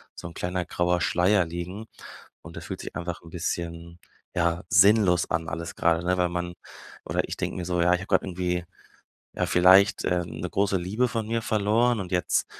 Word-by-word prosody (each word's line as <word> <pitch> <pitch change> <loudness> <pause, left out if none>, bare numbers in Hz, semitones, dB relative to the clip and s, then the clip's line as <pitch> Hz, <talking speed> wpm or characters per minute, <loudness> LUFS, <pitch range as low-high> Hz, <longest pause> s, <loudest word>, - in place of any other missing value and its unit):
so - - -7
'n 85 - -10
kleiner 90 0 -2
grauer 90 0 0
Schleier 90 +3 +3
liegen 85 +6 -6 0.6
und - - -11
das - - -8
fühlt - - -6
sich - - -8
einfach 85 0 -5
'n 85 - -12
bisschen, 85 0 -5 0.4
ja, 85 0 0
sinnlos 100 -3 +4
an 80 0 -1
alles 85 0 -5
grade, 85 0 +1
ne, 90 +1 +1
weil 90 -1 +1
man 90 0 -4 0.5
oder - - 0
ich - - -5
denke - - -3
mir 90 - -4
so, 90 -1 0
ja, 90 +1 +4
ich 90 - +1
habe 95 - -8
grad 95 - +2
irgendwie, 90 -1 -2 0.7
ja, - - -1
vielleicht, 95 +3 +5
äh, 90 -1 +1
'ne - - -6
große 100 0 +1
Liebe 100 +8 0
von 115 -2 -3
mir 115 0 -1
verloren 110 +3 +1
und 90 -1 -8
jetzt 90 -4 +1
90 Hz, 200 wpm, -26 LUFS, 85-100 Hz, 0.7 s, vielleicht